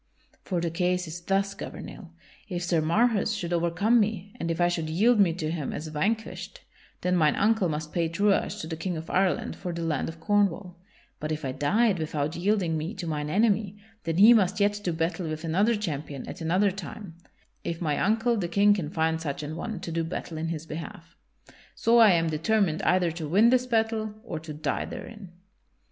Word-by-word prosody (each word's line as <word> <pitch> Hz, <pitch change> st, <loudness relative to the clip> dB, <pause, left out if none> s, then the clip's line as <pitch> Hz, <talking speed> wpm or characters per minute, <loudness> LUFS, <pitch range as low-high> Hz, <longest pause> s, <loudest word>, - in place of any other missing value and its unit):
For 180 Hz, -3 st, -2 dB
the 170 Hz, -1 st, -1 dB
case 180 Hz, +1 st, 0 dB
is 165 Hz, +2 st, -7 dB
thus, 195 Hz, +2 st, 0 dB
Gouvernail; 195 Hz, -2 st, -8 dB, 0.4 s
if 175 Hz, -2 st, -3 dB
Sir 170 Hz, -2 st, +1 dB
Marhaus 210 Hz, +7 st, +2 dB
should 175 Hz, 0 st, -3 dB
overcome 170 Hz, +8 st, +2 dB
me 205 Hz, -2 st, -1 dB
and 170 Hz, -, -2 dB
if 165 Hz, 0 st, -2 dB
I 175 Hz, -, +4 dB
should 165 Hz, -3 st, -2 dB
yield 215 Hz, +8 st, +3 dB
me 190 Hz, -4 st, +5 dB
to 160 Hz, -2 st, -3 dB
him 160 Hz, -4 st, -3 dB
as 155 Hz, +1 st, -5 dB
vanquished, 210 Hz, +9 st, -3 dB, 0.4 s
then 180 Hz, 0 st, +1 dB
mine 155 Hz, -4 st, +3 dB
uncle 210 Hz, -3 st, +2 dB
must 155 Hz, 0 st, -4 dB
pay 170 Hz, -2 st, 0 dB
truage 200 Hz, +4 st, +1 dB
to -, -, -5 dB
the 160 Hz, -, -4 dB
King 175 Hz, +1 st, -3 dB
of 160 Hz, +1 st, -7 dB
Ireland 190 Hz, 0 st, +1 dB
for 180 Hz, -, -5 dB
the 170 Hz, 0 st, -4 dB
land 155 Hz, -4 st, -1 dB
of 165 Hz, 0 st, -9 dB
Cornwall; 195 Hz, -1 st, +1 dB, 0.4 s
but 155 Hz, +1 st, -4 dB
if 155 Hz, -1 st, -3 dB
I 130 Hz, -, -1 dB
died 195 Hz, -, +2 dB
without 155 Hz, -1 st, -2 dB
yielding 180 Hz, -3 st, +1 dB
me 165 Hz, +8 st, -4 dB
to 190 Hz, -, -5 dB
mine 150 Hz, -2 st, -2 dB
enemy, 205 Hz, +1 st, +1 dB, 0.3 s
then 165 Hz, -1 st, -1 dB
he 215 Hz, +5 st, +9 dB
must 200 Hz, -3 st, +2 dB
yet 205 Hz, 0 st, +2 dB
do 180 Hz, -, 0 dB
battle 165 Hz, +1 st, -2 dB
with 155 Hz, +1 st, -5 dB
another 195 Hz, +8 st, +2 dB
champion 150 Hz, -8 st, -4 dB
at -, -, -8 dB
another 185 Hz, +5 st, +2 dB
time, 190 Hz, 0 st, -8 dB, 0.5 s
if 165 Hz, -1 st, -3 dB
my 155 Hz, -4 st, 0 dB
uncle 225 Hz, +4 st, +2 dB
the 180 Hz, -4 st, -1 dB
King 200 Hz, +4 st, +4 dB
can 180 Hz, -7 st, -3 dB
find 160 Hz, 0 st, 0 dB
such 150 Hz, -1 st, -4 dB
an 150 Hz, +2 st, -5 dB
one 210 Hz, +3 st, -4 dB
to 170 Hz, -, -5 dB
do 165 Hz, 0 st, -1 dB
battle 165 Hz, -1 st, -5 dB
in 165 Hz, -, -2 dB
his 165 Hz, -1 st, -4 dB
behalf. 165 Hz, +1 st, -8 dB, 0.6 s
So 235 Hz, +1 st, +4 dB
I 220 Hz, -4 st, +8 dB
am 165 Hz, -1 st, +2 dB
determined 165 Hz, +1 st, +1 dB
either 180 Hz, -2 st, +2 dB
to 160 Hz, -1 st, -5 dB
win 215 Hz, +8 st, +5 dB
this 255 Hz, 0 st, +2 dB
battle 220 Hz, -2 st, 0 dB
or 175 Hz, -9 st, -5 dB
to 155 Hz, 0 st, -9 dB
die 150 Hz, +1 st, -2 dB
therein." 215 Hz, -6 st, -9 dB
175 Hz, 205 wpm, -27 LUFS, 160-205 Hz, 0.6 s, he